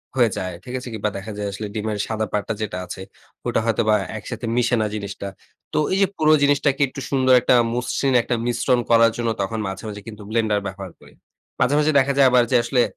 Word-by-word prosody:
হয়ে 120 -3 +4
যায়, 90 -1 -3
ঠিক 125 - -8
আছে? 125 - -9
কিংবা 105 -1 -1
দেখা 100 +3 -7
যায় 105 0 -3
আসলে 105 +2 -5
ডিমের 110 -1 -2
সাদা 110 -1 -1
পার্টটা 105 +1 -1
যেটা 105 -4 -3
আছে, 95 - -8 0.5
ওটা - - +1
হয়তোবা 110 -1 +2 0.2
একসাথে 115 +2 -6
মিশে 120 0 +2
না 110 - +1
জিনিসটা। 100 -1 -5 0.5
তো - - 0 0.2
এই - - +2
যে 195 - +5
পুরো 155 0 +4
জিনিসটাকে 145 -1 +2
একটু 140 - -8
সুন্দর 130 -2 +3
একটা 125 - +4 0.2
মসৃণ 125 +2 0
একটা 120 - -1
মিশ্রণ 120 +1 +1
করার 115 0 +6
জন্য 120 -1 -1
তখন 110 +3 -2
মাঝে, 95 0 -6
মাঝে, 105 -1 -7
কিন্তু 105 -2 -9
ব্লেন্ডার 110 -2 +1
ব্যবহার 95 -1 -7
করি। - - -18 0.5
মাঝে, 135 - +2
মাঝে 150 +1 +3
দেখা 140 +1 +2
যায় 140 -1 +7
আবার 125 -1 +5
যে - - +3
আসলে 125 0 +2
115 Hz, 215 wpm, -22 LUFS, 105-125 Hz, 0.5 s, যায়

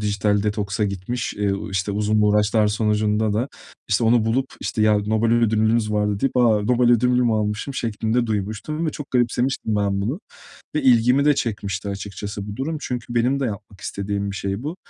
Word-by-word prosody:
dijital 105 -1 +1
detoksa 105 0 -1
gitmiş, 100 +5 -3
eee, 105 -1 0 0.2
işte, 95 +1 -1
uzun 105 +1 +1
uğraşlar 105 +1 +3
sonucunda 105 0 +1
da, 115 +6 -1 0.4
işte, 105 +3 +2
onu 115 0 +4
bulup, 130 +4 +1
işte, 110 - -1
"Ya, 105 -1 +4
Nobel 110 +2 +1
ödülünüz 110 -1 +2
vardı." 105 -1 0
deyip, 135 -2 0
"A! 110 -4 +4
Nobel 120 +2 +3
ödülümü 125 0 +3
almışım." 105 +5 -2
şeklinde 115 +1 -1
duymuştum 110 - -3
ve - - 0
çok 145 -1 -8
garipsemiştim 120 -2 0
ben 100 -1 0
bunu 125 - -2 0.6
ve 150 - +1
ilgimi 125 +2 +4
de 150 -1 +5
çekmişti 100 -6 -3
açıkçası 100 +1 -6
bu 105 - -6
durum. 155 +5 -3
Çünkü 125 -2 -4
benim 125 +4 +2
de 135 - 0
yapmak 100 -3 -7
istediğim 100 0 -3
bir - - -7
şey 100 +4 -3
bu. 155 +4 -4
110 Hz, 175 wpm, -22 LUFS, 105-120 Hz, 0.6 s, de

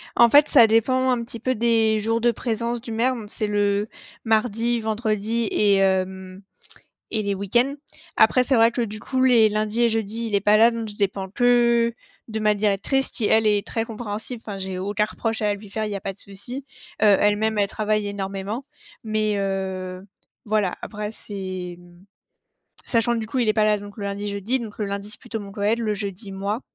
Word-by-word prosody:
En 235 - +6
fait, 290 +4 +6
ça 235 -5 +6
dépend, 255 +4 +2
un 245 -2 +1
petit 230 0 -6
peu, 255 +3 -1
des 225 -1 +2
jours 225 +2 0
de 240 - +4
présence 235 0 -2
du 230 - -8
maire, 240 +4 +1
donc 215 -3 -9
c'est 215 - -2
le, 205 0 0 0.4
mardi, 230 +1 +1
vendredi 220 0 -1
et 205 -2 +4
hem, 190 0 -1 0.7
et 220 - +1
les 200 -1 -1
week-ends. 240 +8 +1 0.4
Après, 255 - +5
c'est 260 +1 +1
vrai 230 +1 +5
que, 245 - -2
du 215 -2 -5
coup, 260 +4 -2
les 240 -4 +5
lundis 215 +2 0
et 235 - +5
jeudis, 225 +1 -2
il 215 - -4
est 200 - +3
pas 210 +2 +4
là, 230 +2 +6
donc 230 -1 -4
je 205 - -7
dépends 195 -1 -1
que 235 0 +3 0.3
de 220 -1 -4
ma 210 0 +3
directrice, 210 +6 +1
qui, 220 - 0
elle, 220 +1 +5
est 205 -1 +3
très 225 - -2
compréhensible. 225 +1 -6
Enfin, 200 -2 -6
j'ai 190 -1 -3
aucun 205 +2 0
reproche 225 +1 -3
à 210 -1 +1
lui 205 0 -12
faire, 220 +2 -2
il 210 - -4
y - - -2
a - - -6
pas 195 - -4
de 190 - -22
souci. 240 +9 -8 0.3
Heu, - - +4
elle-même, 210 +1 +2
elle 200 -1 +2
travaille 215 0 -1
énormément. 200 +4 -4 0.4
Mais, 215 -1 0
heu, 190 -1 -3 0.4
voilà, 210 -4 0
après 210 0 -5
c'est, 185 -4 -6
mmh, 175 +1 -18 0.8
sachant 235 0 +1
que 235 - -1
du 220 - -5
coup, 255 - -2
il 240 - +1
est 215 - +3
pas 215 0 +2
là 210 -1 +2
donc 205 0 -11
le 205 - -7
lundi, 200 +1 -4
jeudi, 205 +6 +1
donc 225 -3 -8
le 210 - -1
lundi 200 +1 -4
c'est 210 - -4
plutôt 230 -2 -6
mon 200 -1 -9
collègue, 210 +2 0
le 220 -2 -1
jeudi, 200 0 -5
moi. 200 +3 -2
215 Hz, 215 wpm, -23 LUFS, 200-230 Hz, 0.8 s, En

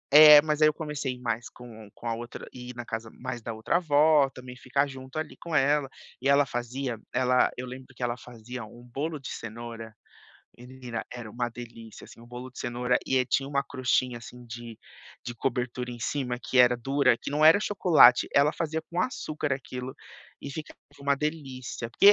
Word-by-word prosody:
é, 150 -1 +11
mas 155 -1 -1
ai 155 - +8
eu - - -2
comecei 145 -5 -4
mais 120 -1 -3
com 110 -4 -12
com 120 - -8
a 115 - 0
outra, 120 +1 -8
ir 125 0 -9
na 120 -1 -6
casa 110 0 -5
mais 125 -2 -5
da 115 0 -5
outra 110 +7 0
avó, 150 -3 +4
também 125 -1 -10
ficar 140 +3 0
junto 130 +1 -9
ali 155 -1 -5
com 170 -2 -4
ela. 145 0 +3 0.3
E 135 - +1
ela 140 +1 +5
fazia, 120 -1 -4
ela 125 0 +3
eu 125 - -4
lembro 130 +1 -10
que 125 - -6
ela 120 0 0
fazia, 120 0 -9
um 120 +3 -14
bolo 145 +6 -4
de 135 - -7
cenoura, 115 0 -7 0.7
menina 125 -1 -7
era 120 -3 -7
um - - -15 0.2
delícia, 115 -2 -10
assim, - - -15
um 120 - -14
bolo 125 +2 -8
de 125 - -14
cenoura, 125 +1 0
e 130 -1 +2
tinha 135 +2 0
um - - -9 0.2
"crostinha", 130 -2 +1
assim, 120 +2 -12
de 120 0 -8 0.5
de 120 - -5
cobertura 125 0 -2
em 120 - -10
cima 125 +1 -2
que 130 - 0
era 125 0 +6
dura, 135 +1 +2
que - - -6
não 150 +2 +2
era 165 +6 +8
chocolate. 175 - +6
Ela 145 +2 +5
fazia 160 -1 -2
com 175 +1 -1
açúcar 155 - -2
aquilo, 130 -1 -7 0.5
e 140 - -6
ficava 155 +2 -8 0.2
um 140 0 +2
delícia, 135 -6 -4
porque, 200 +12 +8
130 Hz, 195 wpm, -27 LUFS, 120-145 Hz, 0.7 s, é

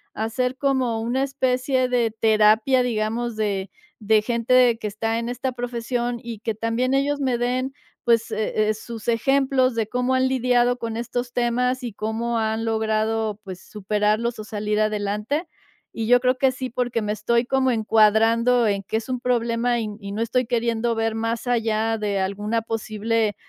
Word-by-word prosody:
hacer 250 +4 -1
como 260 -5 0
una 245 +4 0
especie 255 -1 0
de 240 -3 +1
terapia, 220 +3 +3
digamos, 230 0 -1
de 200 -3 -2 0.3
de 215 0 +3
gente 235 +2 -1
de 250 -2 +5
que 220 - -8
está 225 +2 -2
en 235 +1 -3
esta 250 +1 -3
profesión 240 0 -3
y 230 -3 -7
que 225 +1 -2
también 230 +4 -1
ellos 285 +1 +1
me 255 -3 +1
den, 255 +2 -1 0.3
pues, 230 -1 +2
eh 215 0 0
eh, - - +2
sus 225 +1 -9
ejemplos 260 +1 +2
de 225 -2 0
cómo 250 +2 0
han 260 0 +3
lidiado 245 -1 +2
con 230 -2 -4
estos 245 +1 -3
temas 250 +1 0
y 235 - -4
cómo 225 +3 -2
han 220 0 -1
logrado, 220 -1 0
pues, 185 -1 -8
superarlos 210 +3 -1
o - - -5
salir 210 0 -2
adelante. 215 - -1 0.5
Y 225 -1 -3
yo 245 0 +6
creo 255 0 +1
que 265 0 +3
sí, 255 0 -5
porque 245 -1 -1
me 210 0 -1
estoy 235 +3 +1
como 260 0 +2
encuadrando 225 +2 +3
en 200 -1 0
que 220 - -2
es 225 - -5
un 255 -1 -1
problema 240 0 +1
y 225 - -2
n 210 0 -7
y 200 0 -6
no 215 +3 -3
estoy 250 +2 +1
queriendo 235 -1 0
ver 225 0 -1
más 230 +2 -2
allá 225 -1 +1
de 205 -2 -1
alguna 205 +4 -1
posible 220 -1 -1
230 Hz, 180 wpm, -23 LUFS, 220-250 Hz, 0.5 s, yo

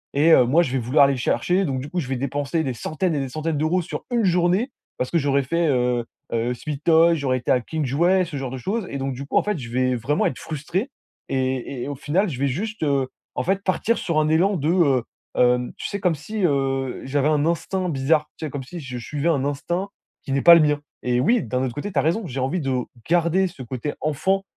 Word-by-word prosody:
Et, 155 +3 +5
heu, 125 -5 +7
moi 160 +8 +4
je 130 - -3
vais 135 - 0
vouloir 135 +5 +4
aller 140 - +2
le 130 - -4
chercher, 180 +9 +1
donc 135 -3 -2
du 145 - -7
coup, 180 - -2
je 130 - -3
vais 135 - -1
dépenser 140 +4 -1
des 130 -3 -2
centaines 160 - -2
et - - 0
des 135 -2 -3
centaines 155 +1 -2
d'euros 160 +4 +1
sur 170 - -6
1 235 -2 +2
journée 180 +7 +2 0.3
parce 125 - -2
que 170 - +2
j'aurais 140 -2 +2
fait, 165 +5 0
heu, 125 -3 +1 0.3
heu, 115 +2 0
Sweet 145 +3 -6
Toys, 165 0 +5
j'aurais 135 -4 0
été 120 - -7
à 125 - +4
King 155 +6 -3
Jouets, 175 +8 +3
ce 155 -4 -6
genre 135 -2 -4
de 130 - -5
choses. 205 - -2
Et - - -3
donc 135 0 -2
du 135 +3 -6
coup, - - 0
en - - +4
fait, 210 -4 -1
je 120 -4 -7
vais 130 0 +1
vraiment 135 +6 0
être 125 - -4
frustré 160 - -3 0.4
et 130 -1 -2
et - - -4
au 145 - -4
final 175 +9 0
je 130 -4 -6
vais 140 - +2
juste, 210 - -3
heu, 140 -3 +1 0.3
en 125 - -1
fait, 195 +2 0
partir 215 +5 +1
sur 165 -3 0
un 155 0 +2
élan 185 +5 +3
de, 150 -1 -1
heu, 140 -9 +3 0.3
hem 125 0 +2
tu - - -4
sais? 200 - -4
Comme 180 -4 +1
si, 205 +8 -5
heu, 135 -3 0
j'avais 140 +2 +1
un 150 -1 +2
instinct 180 +2 -1
bizarre, 150 +2 +1
tu 155 - -5
sais? - - -4
Comme 140 -2 -5
si 175 +6 -8
je 130 -4 -6
suivais 150 +6 -2
un 140 -5 +1
instinct 175 +7 -2 0.3
qui 135 - -6
n'est 140 - +1
pas 170 - +10
le 165 - +6
mien. 150 -1 +2 0.2
Et 125 0 +1
oui, 230 - +3
d'un 130 +1 -1
autre 125 -3 -2
côté, 175 +8 -5
tu - - +1
as - - +4
raison. 175 +7 0
J'ai 135 0 -5
envie 155 +7 -1
de 130 -2 0 0.3
garder 175 +2 +3
ce 170 -7 -11
côté 130 +4 -4
enfant 190 +6 0
150 Hz, 260 wpm, -23 LUFS, 130-175 Hz, 0.4 s, pas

